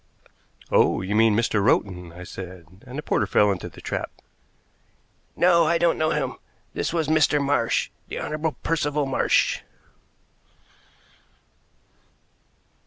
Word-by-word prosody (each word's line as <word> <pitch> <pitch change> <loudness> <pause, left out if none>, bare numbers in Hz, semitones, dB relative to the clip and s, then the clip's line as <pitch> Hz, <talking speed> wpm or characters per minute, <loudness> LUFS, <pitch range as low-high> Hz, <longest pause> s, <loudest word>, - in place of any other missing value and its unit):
"Oh, - - +3
you 95 +2 -3
mean 110 -1 +4
Mr. 110 -2 +1
Rowton," 90 -4 0
I 90 +2 -10
said, 90 +1 -10
and 125 +3 -8
the 150 - -4
porter 105 - 0
fell 105 +1 +3
into 95 -3 -4
the - - -14
trap. - - -3 1.3
"No, 170 -2 +4
I 170 +1 +3
don't 170 0 +2
know 155 0 +2
him. - - -2 0.4
This - - -2
was 160 -3 -1
Mr. 155 -1 +3
Marsh 140 -4 0 0.2
the - - -6
Honorable 155 0 -2
Percival 150 -2 0
Marsh." 135 - +2
130 Hz, 125 wpm, -24 LUFS, 95-155 Hz, 1.3 s, mean